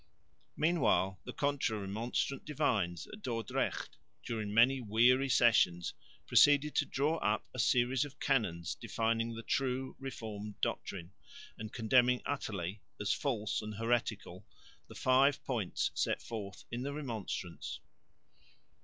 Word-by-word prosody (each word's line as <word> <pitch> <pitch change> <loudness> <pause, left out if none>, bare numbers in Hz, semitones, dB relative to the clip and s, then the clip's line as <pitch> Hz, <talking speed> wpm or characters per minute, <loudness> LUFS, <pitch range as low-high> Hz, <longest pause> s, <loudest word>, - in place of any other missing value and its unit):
Meanwhile 115 - +2
the - - -5
Contra 140 -6 0
Remonstrant 110 +7 -2
divines 110 - 0
at 215 - -9
Dordrecht 115 - -2 0.3
during 110 -3 -3
many 125 +5 +5
weary 125 +5 +4
sessions 90 -9 +4 0.3
proceeded 145 +1 +5
to - - +2
draw 150 +4 +1
up 105 -7 0
a 130 - -6
series 125 +3 +3
of 145 0 -9
canons 90 -11 0
defining 115 0 -1
the 115 - -7
true 130 +1 -1
Reformed 110 -6 -6
doctrine 90 -2 -3 0.4
and 110 0 -7
condemning 125 +2 +3
utterly, 100 -8 -3 0.2
as 105 - +1
false 110 -7 -1
and 105 0 -6
heretical, 115 +2 -1 0.4
the - - -12
five 135 +2 +3
points 115 -8 -1
set - - 0
forth 100 -4 -7
in 120 +1 -3
the 140 +2 -3
Remonstrance. 115 - -5
115 Hz, 125 wpm, -33 LUFS, 105-135 Hz, 0.4 s, many